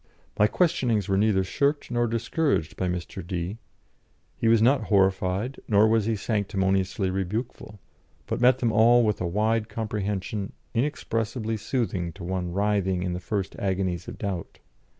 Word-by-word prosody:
My 105 - +6
questionings 125 - +1
were 95 - +1
neither 100 -1 +3
shirked 140 +10 0
nor 120 0 +1
discouraged 115 - 0
by 95 - -1
Mr. 90 +1 -4
D; 90 +4 -3 0.8
he 115 - -1
was 115 0 +5
not 130 +5 +3
horrified 95 +4 +1
nor 105 0 +5
was 110 -1 +2
he 115 0 +1
sanctimoniously 95 -2 0
rebukeful, 105 +2 -4 0.5
but - - -3
met 125 +1 +6
them 120 -3 +1
all 120 +3 +5
with 105 -4 0
a 90 - 0
wide 110 +4 0
comprehension 105 -2 -3 0.2
inexpressibly 115 -3 -1
soothing 100 -6 -2
to 95 - -10
one 90 0 -2
writhing 95 -2 0
in 90 -1 -2
the 90 - -3
first 95 +1 -3
agonies 95 -3 -1
of - - -7
doubt. 95 -5 -4
105 Hz, 150 wpm, -26 LUFS, 95-115 Hz, 0.8 s, My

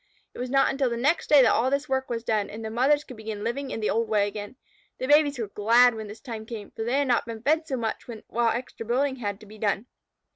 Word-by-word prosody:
It - - -11
was 250 0 -3
not 270 +1 +3
until 270 -2 0
the 235 - -3
next 290 +8 +1
day 290 -3 +8
that - - +4
all 250 +3 +2
this 280 +2 -1
work 265 0 -1
was 230 -1 -3
done, 215 -3 0
and 220 +1 -7
the 220 - -4
mothers 275 +6 +3
could 255 - -11
begin 215 -1 -6
living 265 +4 -3
in 225 - -4
the 210 - +1
old 230 -1 0
way 205 -2 +2
again. 205 +3 -7 0.4
The - - -3
babies 290 0 +4
were 225 -3 -3
glad 235 +4 +5
when 220 -1 -6
this 210 +2 -10
time 225 -4 -7
came, 220 -3 -7
for 225 - -5
they 240 +4 0
had 285 -1 +1
not 240 -1 +1
been 225 -1 -7
fed 315 +3 +2
so 265 - -2
much 225 -2 -3 0.2
while 235 0 +1
extra 240 0 -4
building 260 +4 0
had 205 -4 -4
to - - -12
be 215 +1 -14
done. 205 +1 0
235 Hz, 270 wpm, -26 LUFS, 220-265 Hz, 0.4 s, day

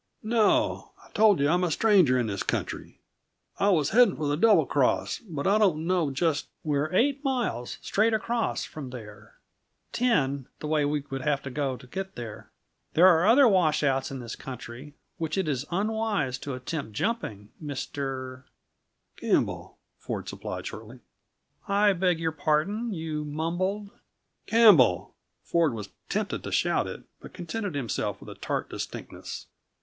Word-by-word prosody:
"No. 220 -1 +1
I - - -21
told 210 -5 +4
you 140 - +3
I'm 175 +4 +2
a 180 - +1
stranger 180 - +4
in 125 - +1
this 100 -3 -3
country. - - -3 0.6
I 200 - +3
was 155 -7 +2
heading 245 +3 +5
for 150 - -3
the 145 - +1
Double 185 -2 +5
Cross, 125 -9 +1
but 145 -4 -4
I 205 +2 +4
don't 170 -7 +2
know 175 -4 +1
just 150 +2 0
" - - -48
"We're 150 0 0
eight 275 +8 +2
miles, 240 - -2
straight 220 +3 +2
across, 225 +1 -1
from 145 -4 -8
there; 110 -3 -11 0.6
ten, 140 - +1
the - - -6
way 150 -1 +1
we 145 0 0
would 135 0 -3
have 145 -1 0
to 140 - -6
go 135 -2 -2
to 125 - -14
get 190 +9 -6
there. 115 -3 -8 0.5
There 170 - +7
are 175 0 +6
other 255 +4 +7
washouts 150 - +2
in 135 - -5
this 120 -2 -6
country 130 +2 -9 0.2
which 160 0 -2
it 190 -4 0
is 140 -1 -2
unwise 205 - -1
to 140 -1 -5
attempt 130 -2 -5
jumping, 105 - -3
Mr. 135 -2 -5 0.3
" - - -47
"Campbell," - - -1 0.2
Ford - - -5
supplied - - -6
shortly. 115 +3 -8 0.7
"I 200 0 +4
beg 180 -2 +1
your 165 -1 0
pardon? 160 +10 0
You 160 -4 -3
mumbled 175 +7 -2 0.3
" - - -51
"Campbell!" 175 - +5 0.3
Ford 165 -7 +1
was 105 -3 -6 0.2
tempted - - -2
to - - -5
shout - - +1
it - - -7 0.2
but - - -12
contented 185 0 -4
himself 125 -7 -2
with - - -11
a - - -7
tart - - -2
distinctness. - - -7
155 Hz, 165 wpm, -27 LUFS, 135-200 Hz, 0.7 s, There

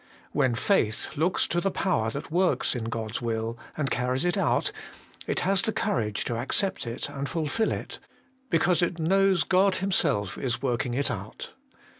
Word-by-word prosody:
When 130 -5 +2
faith 115 - +1
looks 165 +5 +2
to 175 - 0
the 195 - +1
Power 175 - 0
that 140 +7 -6
works 180 +2 +2
in 120 -4 -3
God's 115 0 -3
will, 115 -1 -2 0.2
and 140 -3 -1
carries 125 +4 0
it 175 - +2
out, - - +1 0.6
it - - 0
has 195 0 +2
the 220 - 0
courage 115 - -1
to 115 - -2
accept 165 - 0
it 115 - -3
and 140 0 -4
fulfil 170 +6 0
it, - - -4 0.5
because 175 0 +3
it 175 0 0
knows 190 +1 +3
God 190 +4 +3
Himself 145 - 0
is 125 -2 -1
working 120 -2 -1
it 140 +2 +1
out. - - -7
145 Hz, 170 wpm, -27 LUFS, 120-185 Hz, 0.6 s, because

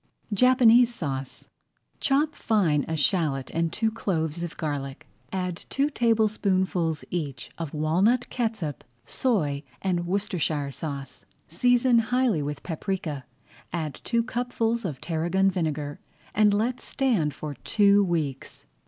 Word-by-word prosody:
JAPANESE 245 +1 +6
SAUCE 135 - -4 0.5
Chop 295 +3 +2
fine 180 - +1
a 160 - -1
shallot 145 -4 +1
and 165 -1 0
two 220 +4 0
cloves 170 -7 -2
of 170 -1 -5
garlic. 140 -3 -4 0.3
Add 180 -2 -2
two 280 +2 +1
tablespoonfuls 195 - +1
each 145 -8 -4
of 160 -3 -4
walnut 185 +11 +2
catsup, 220 - -2 0.2
soy, 155 - 0 0.2
and 175 -2 -1
Worcestershire 175 -7 -1
sauce. 140 -1 -6 0.2
Season 245 +7 +3
highly 240 - +1
with 145 0 -4
paprika, 160 -5 -3 0.5
add 155 -4 -4
two 235 -1 +1
cupfuls 235 -2 -1
of 145 -8 -4
tarragon 175 +4 +1
vinegar, 150 -5 -2 0.3
and 210 0 +4
let 225 +5 0
stand 210 - 0
for 150 -1 -5
two 200 - +3
weeks. 155 -7 -3
180 Hz, 120 wpm, -26 LUFS, 150-225 Hz, 0.5 s, JAPANESE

